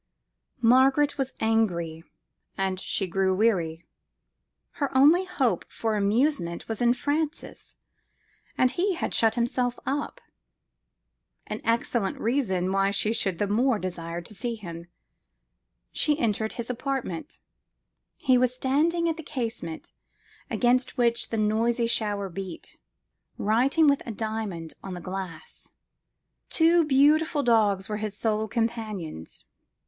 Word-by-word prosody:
Margaret 270 +5 +4
was 265 -1 -1
angry, 175 -8 0 0.5
and 190 -1 -1
she 195 - -1
grew 190 +1 +1
weary: 180 -6 +1 1.0
her 280 - +2
only 320 +8 +6
hope 285 -10 0
for 225 -1 -1
amusement 205 - 0
was 225 0 -4
in 240 0 +4
Francis, 300 +3 -3 0.8
and 255 -1 +4
he 370 +1 0
had - - -3
shut 225 -1 +3
himself 245 +1 0
up 285 +2 -2 1.3
an - - -5
excellent 230 -2 0
reason 200 -7 0
why 195 0 +2
she 210 +2 +1
should 195 -6 -1
the 205 - +1
more 230 +4 +2
desire 175 -3 -5
to 195 - -10
see 235 +3 -3
him. 170 -5 -9 1.0
She 295 -1 +1
entered 220 -4 -1
his 235 +1 -4
apartment: 265 - -4 0.8
he 255 -3 +3
was 255 0 +2
standing 320 +7 +1
at 325 -1 -1
the - - -6
casement, 235 - -5 0.6
against 250 +2 +1
which 235 -1 +1
the 225 - -2
noisy 225 +3 +1
shower 205 -3 0
beat, 190 -1 -8 0.6
writing 255 +9 +3
with 280 -1 +4
a - - -3
diamond 215 -7 -4
on 190 -2 -6
the - - -6
glass. 185 -2 -8 0.8
Two 335 0 +4
beautiful 300 +1 +3
dogs 210 -5 +3
were 210 - -3
his 210 -1 -4
sole 220 -1 0
companions. 215 - -4
225 Hz, 125 wpm, -26 LUFS, 195-265 Hz, 1.3 s, only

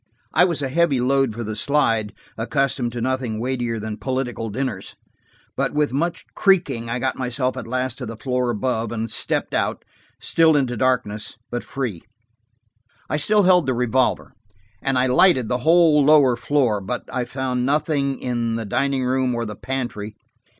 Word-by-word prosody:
I 180 - +5
was 170 -5 -1
a 135 - -1
heavy 155 -2 +2
load 135 0 +2
for 115 +2 -5
the 110 -1 -4
slide, 115 -6 +1 0.2
accustomed 125 +1 -1
to 120 - -4
nothing 130 -3 -1
weightier 120 -1 -2
than 105 0 -5
political 125 -1 -3
dinners, 125 -3 -4 0.6
but - - -1
with 150 -3 +1
much 170 +5 -1
creaking 145 - +2
I 120 - -1
got 130 +1 -1
myself 125 +1 -1
at 125 -3 -6
last 130 +2 -2
to - - -5
the 115 - -7
floor 125 +1 -1
above, 115 0 -1
and 115 -1 -3
stepped - - 0
out, - - -1 0.3
still 160 -1 +3
into 130 -4 +1
darkness, 120 -4 -1
but 120 0 -3
free. 120 -11 -4 1.1
I - - +1
still 210 +6 +3
held 180 -5 +4
the 130 - +1
revolver, 125 +1 0 0.5
and 135 -1 0
I 125 - +3
lighted 130 - +4
the 125 - 0
whole 160 +1 +5
lower 140 -4 +5
floor. 120 -5 +1
But 120 +6 -4
I 125 - 0
found 125 0 -2
nothing 140 0 0
in 120 -2 -2
the 115 -1 -3
dining 135 +5 0
room 130 -1 0
or 120 0 -2
the 105 -1 -6
pantry. 115 -4 -4
130 Hz, 170 wpm, -22 LUFS, 115-140 Hz, 1.1 s, I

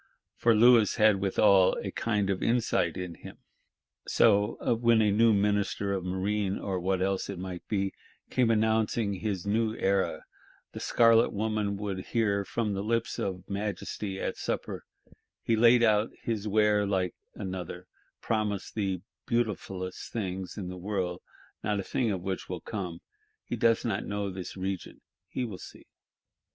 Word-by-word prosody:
For 115 -1 +3
Louis 115 -1 +6
had 105 -2 +5
withal 100 -1 +4
a - - -4
kind 105 -4 0
of 95 - -2
insight 115 -7 +1
in 90 -2 -4
him. - - -11 0.7
So, 105 +2 +3 0.2
when 115 -1 +5
a 105 -2 +3
new 115 +3 +5
Minister 100 -1 +1
of 95 -2 -2
Marine, 95 +2 -1
or 95 -2 -3
what 95 +1 0
else 95 0 -1
it 100 - -4
might 90 -1 -6
be, 100 -2 -1 0.4
came 125 -3 +2
announcing 110 -1 +2
his 95 -2 -3
new 110 +2 +1
era, 100 -2 0 0.5
the - - -7
Scarlet 115 0 +4
woman 105 -1 -1
would 100 -2 -3
hear 100 -4 +1
from 105 +1 -2
the 95 - -2
lips 115 +2 -1
of 90 -1 -3
Majesty 100 -1 -4
at - - -3
supper: - - -4 0.2
'Yes, - - -24 0.3
he 115 - +3
spread 120 +2 +6
out 110 -1 +3
his 110 -2 -2
ware 105 0 +3
like 95 -3 0 0.2
another; 90 -1 -6 0.4
promised 105 -3 -1
the 95 -4 -1 0.3
beautifulest 95 -5 -2
things 95 -4 -4
in 95 -4 -4
the 90 0 -6
world; 90 -2 -3 0.4
not 105 -1 0
a - - -2
thing 120 +4 0
of 95 -4 -2
which 95 -1 -4
will 90 -3 -4
come: 90 -6 -5 0.4
he - - -4
does 115 0 +2
not 105 -4 -1
know 100 -1 -2
this 95 0 -7
region; 95 -1 -4 0.3
he 125 - -2
will 100 -6 -7
see. - - -12
100 Hz, 160 wpm, -29 LUFS, 95-110 Hz, 0.7 s, Louis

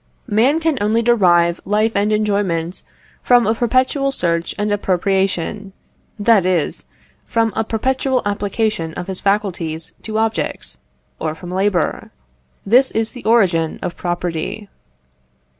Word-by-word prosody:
Man 250 +7 +2
can 320 -5 0
only 220 +3 +2
derive 175 -7 +3
life 215 +2 +1
and 205 +1 +1
enjoyment 200 -5 -1 0.4
from 245 -1 +4
a 220 - +2
perpetual 255 +4 +1
search 170 -8 -1
and 210 0 -1
appropriation; 195 0 -1 0.4
that 210 -2 +4
is, 180 -4 -1 0.4
from 225 -1 +1
a 220 - +1
perpetual 260 +3 0
application 205 -4 -1
of 180 - -5
his 190 0 -3
faculties 180 -6 -1
to 215 -1 -4
objects, 225 0 -2 0.4
or 155 -1 -3
from 175 +2 -9
labour. 190 -2 0 0.6
This 250 +6 +4
is 225 0 -1
the 245 - -10
origin 185 -8 +2
of 175 - -3
property. 175 +3 -4
205 Hz, 125 wpm, -18 LUFS, 180-225 Hz, 0.6 s, from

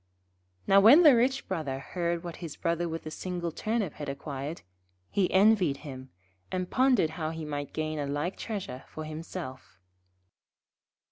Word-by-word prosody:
Now, 195 - +6
when 250 - +8
the 295 -5 +9
rich 255 +3 +1
Brother 155 -8 -2
heard 170 +4 -2
what 170 -1 -6
his 165 -4 -7
Brother 170 0 -1
with 165 0 -5
the 155 - -6
single 175 0 -4
Turnip 215 -1 -1
had 145 -1 -6
acquired, 140 +2 -5 0.5
he 190 -3 +2
envied 190 -7 +4
him, 130 -2 -8 0.4
and 185 -1 -2
pondered 255 - +3
how 160 -1 -3
he 160 -1 -5
might 145 -1 -4
gain 155 -1 -3
a 145 - -2
like 145 +6 -2
treasure 190 - -5
for 155 - -7
himself. 155 - -7
165 Hz, 155 wpm, -29 LUFS, 145-190 Hz, 0.5 s, the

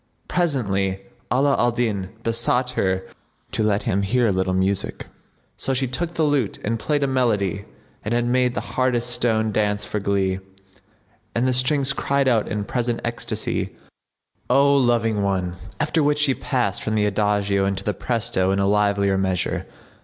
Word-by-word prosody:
Presently 100 - 0 0.3
Ala 135 +2 +3
al 120 - +4
Din 110 -6 -1
besought 120 +2 +1
her 95 -5 0 0.5
to - - -1
let 105 -1 +1
him 100 - 0
hear 120 +5 +2
a 110 - +3
little 95 0 0
music; 95 +1 -1 0.5
so 135 - -1
she 130 +1 +1
took 165 +7 -3
the 160 - +1
lute 145 -8 +1
and 115 +2 -1
played 145 +2 0
a - - +2
melody 105 -7 0 0.4
that 105 - -3
had 120 0 +1
made 125 0 +2
the - - -1
hardest 125 -2 +1
stone 115 -3 +1
dance 105 -1 0
for 105 - -3
glee, 95 -1 0 1.0
and 120 +3 +2
the 130 - +2
strings 135 +2 +2
cried 140 -1 0
out 115 -4 +2
in 105 0 -2
present 120 +1 -1
ecstacy, 115 0 -2 0.7
"O 140 +2 +5
Loving 115 -5 +2
One!'';[FN#69] 95 -3 -1 0.2
after 155 +1 +1
which 145 0 +2
she 150 -2 +3
passed 125 -8 -1
from 110 - -2
the 105 -1 +2
adagio 100 -1 +1
into 95 -1 -2
the 105 - -1
presto 115 -3 -1
and 95 +1 +1
a 100 - +2
livelier 100 -1 +2
measure. 95 -2 -1
115 Hz, 170 wpm, -22 LUFS, 100-130 Hz, 1.0 s, O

